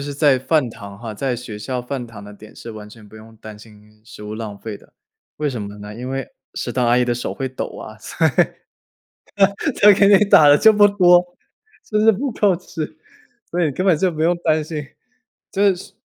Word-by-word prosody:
是 140 0 -5
在 145 -2 +3
饭 130 +1 +1
堂 100 -3 -11
哈， 115 -2 -7
在 130 +4 -2
学 115 -3 -8
校 125 +4 -4
饭 125 0 -5
堂 105 -3 -12
的 105 - -11
点 105 +1 -15
是 115 - -9
完 105 -1 -10
全 105 0 -15
不 105 - -18
用 110 +1 -15
担 110 -1 -11
心 105 0 -18
食 105 - -12
物 105 0 -6
浪 110 -2 -7
费 110 -1 -7
的， - - -23 0.4
为 150 -1 -1
什 120 -4 -5
么 100 0 -7
呢？ 105 +1 -9
因 125 +3 -7
为 135 -1 -4 0.3
食 - - -4
堂 125 -2 0
阿 120 - +3
姨 125 - +3
的 120 0 -1
手 120 - -4
会 135 - -4
抖 130 - -5
啊， 110 0 -10
所 160 +8 -1
以， - - +2 1.5
她 205 0 +8
给 200 +1 +4
你 205 0 +6
打 155 -7 +6
了 145 - +6
这 220 - +6
么 205 -1 +5
多， 180 -3 +5 0.6
就 210 -1 0
是 220 +1 +6
不 245 +5 -2
够 205 -4 +2
吃， 160 -3 -7 0.5
所 175 +1 -1
以 155 - 0
根 185 +8 -3
本 180 - +4
就 185 +4 +1
不 155 -2 -4
用 175 +2 +2
担 155 -2 +1
心， 150 -1 -5 0.7
就 200 0 +3
是 180 - -12
130 Hz, 245 characters per minute, -20 LUFS, 110-170 Hz, 1.5 s, 她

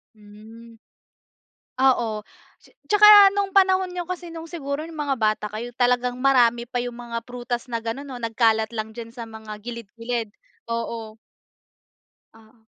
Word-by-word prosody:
Hmm. 220 +2 -15 1.0
Ah, 265 +1 +5
oh. 215 -2 -3 0.4
Ts - - -21 0.2
tsaka 415 -1 +9
no’ng 400 -1 0
panahon 375 -1 +3
niyo 355 -1 -5
kasi 355 -2 -6
no’ng 330 0 -8
siguro 300 -2 -5
no’ng 330 - -11
mga 290 -3 -1
bata 215 -1 +1
kayo 235 +3 -6
talagang 245 0 +1
marami 245 -3 +3
pa 245 +1 -4
yung 245 0 -4
mga 235 -1 -5
prutas 245 0 -4
na 230 -2 -4
ganon 230 +5 -5
'no, 265 - -7
nagkalat 225 -1 +1
lang 220 -1 -5
diyan 230 -1 -8
sa 235 -1 -8
mga 220 -1 -9
gilid-gilid, 230 0 -5 0.4
oo. 230 -1 -4 1.2
Oo. 220 0 -22
240 Hz, 150 wpm, -23 LUFS, 225-275 Hz, 1.2 s, tsaka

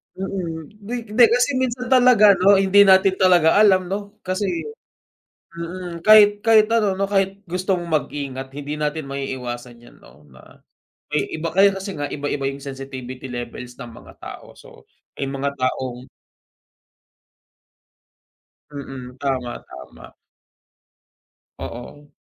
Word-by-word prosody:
Mm, 175 -5 -5
hindi 220 +4 -6 0.2
di, 240 +3 +5
kasi 245 +4 +2
minsan 250 0 -3
talaga 245 -5 +6
ano 195 +2 +4
hindi 195 +1 +5
natin 190 0 +5
talaga 175 -3 +5
alam 190 -3 +4
no 205 +1 -5
kasi, 185 +2 -2 1.1
mm. 170 0 -7
Kahit 205 -1 +7
kahit 220 -1 +5
ano 210 -4 +2
no 195 - 0
kahit 195 0 0
gusto 185 +2 -1
mong 170 -1 -6 0.2
mag-ingat 135 -2 -6
hindi 145 +1 -6
natin 150 0 -2
maiiwasan 125 -3 -6
yan - - -17
no, 75 - -19
na 65 0 -19 0.5
may 150 - +2 0.2
iba 165 +1 -3
kaya 200 +1 +6
kasi 195 0 -6
nga 145 -1 -4
iba 145 0 -5
iba 140 -1 -3
yung 140 - -8
sensitivity 130 -1 -8
levels 120 0 -7
ng 125 -2 -8
mga - - -14
tao - - -10
so - - -16 0.3
may 140 - -3
mga 140 +1 -3
taong 130 0 -3 2.6
Mm, 130 -3 -9
tama 130 -3 -3
tama. 65 0 -13 1.4
Oo. 145 +5 -9
165 Hz, 130 wpm, -21 LUFS, 135-200 Hz, 2.6 s, Kahit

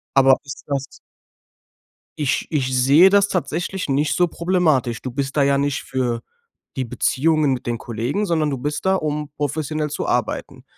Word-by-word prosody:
Aber 135 -1 +6
ist 140 - -9
das 140 -1 -1 1.3
Ich 150 0 0
ich 130 -4 0
sehe 145 +9 +6
das 200 0 +4
tatsächlich 180 -1 -3
nicht 140 +1 +1
so 175 -1 +3
problematisch. 160 - +1
Du 130 - -4
bist 135 +2 -3
da 145 - +3
ja 140 0 +3
nicht 140 0 -1
für 125 -3 -2 0.5
die 130 -2 -2
Beziehungen 150 +4 +1
mit 125 - -5
den 120 -1 -1
Kollegen, 120 - -2
sondern 160 -4 +1
du 135 - -2
bist 150 +7 -4
da, 190 0 +3
um 150 -3 -2
professionell 150 +1 -2
zu 145 - -4
arbeiten. - - -2
145 Hz, 165 wpm, -21 LUFS, 130-160 Hz, 1.3 s, Aber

